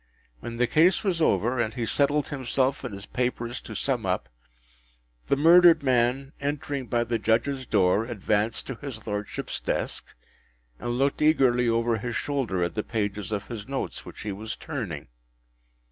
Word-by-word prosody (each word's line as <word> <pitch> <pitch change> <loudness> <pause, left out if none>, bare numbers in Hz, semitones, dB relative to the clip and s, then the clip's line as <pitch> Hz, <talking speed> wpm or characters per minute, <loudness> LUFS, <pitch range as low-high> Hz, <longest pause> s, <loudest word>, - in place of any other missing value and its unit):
When 115 - -6
the 125 - +3
case 165 - +4
was 180 -5 0
over, 125 -4 +2
and 115 -1 -1
he 120 -3 -1
settled 145 +4 +2
himself 135 0 0
and 125 - -4
his 100 0 -8
papers 120 -1 -2
to - - -9
sum - - 0
up, - - -1 1.0
the - - +3
murdered 165 +1 +7
man, 130 +2 +1
entering 140 -2 -3
by 120 -1 +1
the 115 -1 -1
Judges’ 130 +3 0
door, 100 +1 +3
advanced 110 -1 0
to 135 - -5
his 140 -4 -7
Lordship’s 105 -1 -3
desk, - - -3 0.6
and 120 0 -2
looked 140 +3 +1
eagerly 130 -6 +4
over 115 0 +1
his 120 +2 -4
shoulder 125 -11 -1
at 85 - -1
the 105 - -1
pages 105 -2 -3
of 105 -1 -2
his 110 -4 -7
notes 135 0 -4
which - - -10
he 105 - -3
was 110 +3 -5
turning. 105 - -5
120 Hz, 165 wpm, -26 LUFS, 110-140 Hz, 1.0 s, murdered